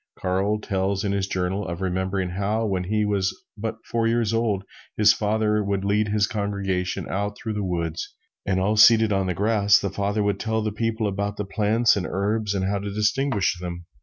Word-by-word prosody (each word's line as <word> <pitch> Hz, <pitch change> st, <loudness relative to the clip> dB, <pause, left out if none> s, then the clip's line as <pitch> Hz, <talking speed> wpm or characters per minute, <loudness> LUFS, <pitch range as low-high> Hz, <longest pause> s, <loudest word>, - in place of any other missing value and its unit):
Carl 95 Hz, +3 st, 0 dB
tells 100 Hz, -1 st, -1 dB
in 100 Hz, -, 0 dB
his 100 Hz, -1 st, -1 dB
journal, 95 Hz, +2 st, -1 dB
of 85 Hz, 0 st, -4 dB
remembering 95 Hz, 0 st, -1 dB
how, 105 Hz, +4 st, -1 dB
when 95 Hz, -3 st, -1 dB
he 105 Hz, +2 st, 0 dB
was 100 Hz, -2 st, -1 dB, 0.2 s
but 110 Hz, +1 st, -4 dB
four 115 Hz, -1 st, 0 dB
years 115 Hz, -1 st, +1 dB
old, 110 Hz, -4 st, 0 dB, 0.3 s
his 105 Hz, 0 st, +6 dB
father 105 Hz, 0 st, +1 dB
would 100 Hz, -1 st, -1 dB
lead 105 Hz, +1 st, +2 dB
his 105 Hz, 0 st, +2 dB
congregation 100 Hz, -4 st, -2 dB
out 100 Hz, +1 st, -3 dB
through 110 Hz, -, -4 dB
the 105 Hz, -1 st, -2 dB
woods 85 Hz, -3 st, -3 dB, 0.3 s
and, 95 Hz, -1 st, 0 dB
all 100 Hz, +3 st, +1 dB
seated 110 Hz, 0 st, +6 dB
on 95 Hz, -1 st, 0 dB
the 90 Hz, -, -1 dB
grass, 105 Hz, 0 st, +4 dB
the 100 Hz, -, -2 dB
father 100 Hz, +1 st, -1 dB
would 100 Hz, 0 st, 0 dB
tell 110 Hz, -1 st, -1 dB
the 110 Hz, -, -1 dB
people 110 Hz, +1 st, -1 dB
about 100 Hz, +1 st, -2 dB
the 105 Hz, -, -3 dB
plants 110 Hz, +3 st, +2 dB
and 95 Hz, -3 st, -2 dB
herbs 105 Hz, +1 st, -1 dB
and 95 Hz, -1 st, 0 dB
how 100 Hz, +1 st, 0 dB
to 100 Hz, +1 st, -5 dB
distinguish 105 Hz, -2 st, +1 dB
them. 85 Hz, -1 st, -6 dB
100 Hz, 200 wpm, -24 LUFS, 95-105 Hz, 0.3 s, his